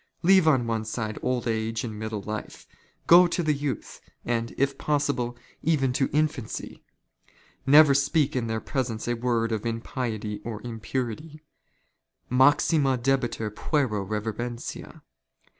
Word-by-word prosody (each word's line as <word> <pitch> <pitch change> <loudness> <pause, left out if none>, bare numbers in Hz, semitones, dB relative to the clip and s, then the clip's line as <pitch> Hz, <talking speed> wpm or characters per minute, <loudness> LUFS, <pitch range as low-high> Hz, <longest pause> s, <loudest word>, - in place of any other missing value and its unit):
Leave 190 -1 +5
on 130 -6 +4
one 115 -1 -1
side 110 -1 -4
old 125 -1 -1
age 110 0 -1
and 110 -3 -5
middle 110 -2 -4
life, 110 +1 -6 0.4
go 175 +1 +8
to 175 0 -1
the 155 -1 +2
youth, 145 -2 -4 0.2
and, 115 -1 -1
if 140 0 +1
possible, 140 -5 -1 0.2
even 140 -5 +1
to 135 +1 +1
infancy. 150 -5 -2 0.4
' - - -31
Never 145 +1 +8
speak 140 +1 +1
in 120 -3 -1
their 110 0 -1
presence 120 -6 -3
a 120 - +1
word 115 -1 0
of 110 -2 -2
impiety 115 -2 -3
or 115 -3 -5
impurity. 125 +6 -5 0.9
Maxima 135 +1 +4
dehetur 120 -4 0
jpuero 115 -4 -1
reverentia. 115 +3 -5
125 Hz, 135 wpm, -26 LUFS, 110-140 Hz, 0.9 s, go